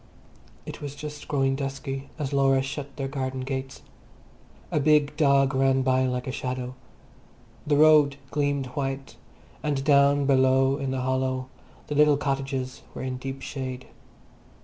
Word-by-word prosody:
It - - -8
was 145 -1 -6
just 150 0 -8
growing 135 -2 +1
dusky 135 0 -5
as 145 -2 -3
Laura 135 -1 +3
shut 140 0 -6
their 135 -1 -2
garden 130 -1 -3
gates. 135 0 -5 0.9
A - - +1
big 150 0 +3
dog 140 -2 +3
ran 135 0 +2
by 130 0 +2
like 125 0 -2
a 130 - -3
shadow. 125 -1 -4 0.9
The 145 -1 +3
road 150 -2 +6 0.2
gleamed 145 -2 0
white, 135 -1 -4 0.4
and 145 -3 -1
down 140 0 +4
below 135 0 +3
in 135 -2 -3
the 130 -1 -2
hollow 130 0 -1 0.4
the - - -4
little 150 0 +5
cottages 135 -2 -3
were - - -5
in 130 -1 -3
deep 135 +1 -6
shade. 130 -2 -6
135 Hz, 150 wpm, -26 LUFS, 130-140 Hz, 0.9 s, road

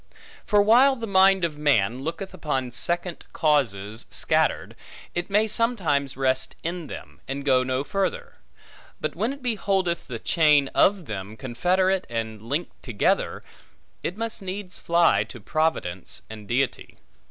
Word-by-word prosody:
For 205 -1 +4
while 250 +6 +6
the 230 -3 -5
mind 190 -2 +4
of 150 -3 -5
man 125 -5 +2
looketh 170 +6 -5
upon 130 -5 -2
second 175 +7 -1
causes 115 -9 0
scattered, - - +1 0.4
it 175 +2 -3
may 210 +2 +3
sometimes 185 - 0
rest 130 0 +1
in 170 -1 -4
them, - - -10
and 135 +1 -4
go 130 -2 +4
no 130 +1 -1
further; 475 - -2 0.6
but - - -3
when 230 - 0
it 280 -1 -9
beholdeth 195 -7 0
the 125 - -5
chain 150 +1 +3
of 195 -3 +3
them, 100 -1 -6
confederate 180 +9 +1
and 110 -2 -4
linked 145 +10 -4
together, 115 -5 0 0.6
it 180 - -4
must 225 -1 -4
needs 190 0 -5
fly 170 0 +3
to 120 - -11
Providence 100 - -2
and 105 -2 -10
Deity. 130 +4 -1
160 Hz, 140 wpm, -25 LUFS, 130-195 Hz, 0.6 s, while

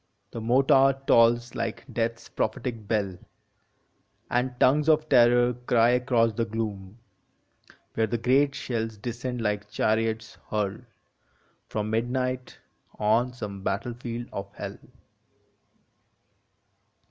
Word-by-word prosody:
The 115 - -6
mortar 135 +3 +4
tolls 120 0 +4
like - - -4
Death 115 0 0
s 115 - -16
prophetic 110 -1 -3
bell, 100 -5 -1 1.1
And 125 0 0
tongues 150 +4 +4
of 155 0 +3
terror 120 -1 +5
cry 120 -1 +2
across 125 -2 +2
the 115 - -1
gloom, 105 -3 -5 1.0
Where 110 0 +1
the 120 - -1
great 135 +5 +2
shells 115 -3 -3
descend 120 +2 -4
like 105 -1 -2
chariots 110 0 -1
hurled 105 +2 -2 0.8
From 105 0 -3
midnight, 125 +2 -2 0.4
on 115 +4 +2
some 100 -5 -7
battlefield 120 +4 -4
of 100 0 -6
Hell. - - -7
115 Hz, 110 wpm, -26 LUFS, 110-125 Hz, 1.1 s, terror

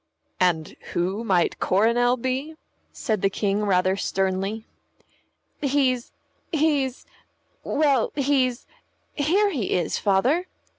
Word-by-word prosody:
"And 170 -4 +2 0.2
who 190 +6 -1
might 185 -6 +1
Coronel 235 +5 +2
be?" 260 +6 -3 0.4
said 215 -6 -2
the 195 - +3
King, 200 +1 -1
rather 185 -1 +2
sternly. 195 +3 -2 1.0
"He's 265 -3 +1 0.4
he's 290 -5 0 0.6
well, 285 -5 +2
he's 265 -3 +1 0.5
Here 380 +8 +2
he 240 - -2
is, 175 -3 -1
Father." 250 - +2
235 Hz, 100 wpm, -24 LUFS, 195-280 Hz, 1.0 s, the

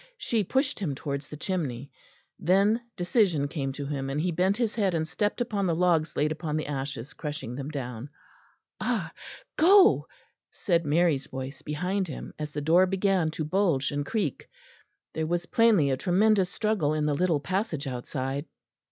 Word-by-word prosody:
She 225 - 0
pushed 265 - 0
him 160 -9 -2
towards 140 0 -4
the 150 - -9
chimney. 140 -8 -3 0.5
Then 200 +6 +3 0.2
decision 175 - +2
came 140 -2 -3
to 140 +1 -5
him, 140 -1 -3
and 140 +2 -1
he 175 +3 0
bent 185 +4 +1
his 235 -3 0
head 195 -6 +1
and 160 -1 -1
stepped 205 +7 -1
upon 205 -5 0
the 170 - +1
logs 165 -2 +2
laid 150 +1 +1
upon 155 -1 -2
the 155 - -2
ashes, 140 -2 -5
crushing 150 -5 -5
them 140 +2 -5
down. 125 -3 -5 0.7
"Ah! - - -1 0.4
go," 385 +5 +6 0.4
said 170 -5 0
Mary's 150 -3 +2
voice 130 +1 -6
behind 180 +6 -2
him, 150 - -7
as 150 -1 -4
the 150 - -4
door 170 +5 +4
began 190 -3 +1
to 155 0 -4
bulge 165 -5 +1
and 145 0 -1
creak. 170 - -2 0.6
There 160 0 -2
was 175 +1 -1
plainly 215 - +4
a 130 - +1
tremendous 190 +3 +3
struggle 190 -8 0
in 150 -1 0
the 150 - +1
little 165 0 +2
passage 170 -1 -2
outside. 135 +2 -3
160 Hz, 170 wpm, -27 LUFS, 145-190 Hz, 0.7 s, go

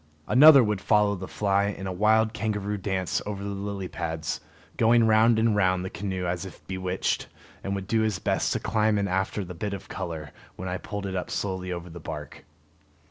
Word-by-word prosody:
Another 140 0 +8
would 105 -3 -1
follow 105 0 +3
the 95 -1 -6
fly 100 -1 +1
in 100 -1 -4
a 95 - -3
wild 110 +3 +3
kangaroo 105 -2 -2
dance 95 -3 -1
over 100 -1 -5
the 100 - -3
lily 100 -1 -4
pads, 80 -2 -4 0.3
going 115 +1 +4
round 110 +1 +5
and 110 -1 +3
round 95 -2 +2
the 95 - -5
canoe 95 -2 -3
as 90 +1 -2
if 95 - -11
bewitched, 95 0 -2 0.4
and 100 0 -2
would 95 -1 -4
do 110 +3 +1
his 110 -3 0
best - - 0
to - - -1
climb 110 -1 +1
in 100 -1 0
after 95 +1 -1
the 90 - -7
bit 100 +4 -3
of 95 - -11
color 80 -6 -5 0.2
when 95 - -6
I 90 0 -3
pulled 100 -1 -5
it 95 -1 -3
up 90 - -3
slowly 95 -2 -3
over 85 0 -5
the 85 0 -9
bark. 75 -2 -8
100 Hz, 205 wpm, -26 LUFS, 90-105 Hz, 0.4 s, Another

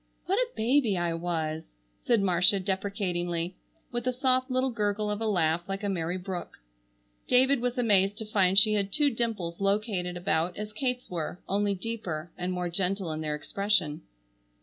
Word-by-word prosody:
"What 390 +5 +1
a - - +1
baby 230 -3 +2
I 175 -1 0
was!" 165 -2 -2 0.3
said 230 -4 +2
Marcia 185 +1 +4
deprecatingly, 180 -3 -2 0.4
with 240 0 -3
a - - +3
soft 255 +1 +2
little 255 +1 +1
gurgle 210 -1 -1
of 210 +1 -3
a 225 - 0
laugh 170 -3 +1
like 195 +2 -3
a 205 - 0
merry 175 -1 -1
brook. 185 -1 -6 0.7
David 260 +1 +4
was 245 +1 -1
amazed 205 -4 +3
to 220 - -5
find 195 -3 +2
she 215 +2 +7
had 200 -2 0
two 295 +2 +3
dimples 210 -8 -3
located 195 -3 0
about 170 0 0
as 210 0 -5
Kate's 250 0 -2
were, 170 +1 -3
only 200 +1 +1
deeper, 180 -6 -5
and 180 +1 -3
more 180 -1 -2
gentle 180 0 -1
in 155 0 -3
their 150 -1 -1
expression. 160 -1 0
195 Hz, 170 wpm, -28 LUFS, 175-225 Hz, 0.7 s, she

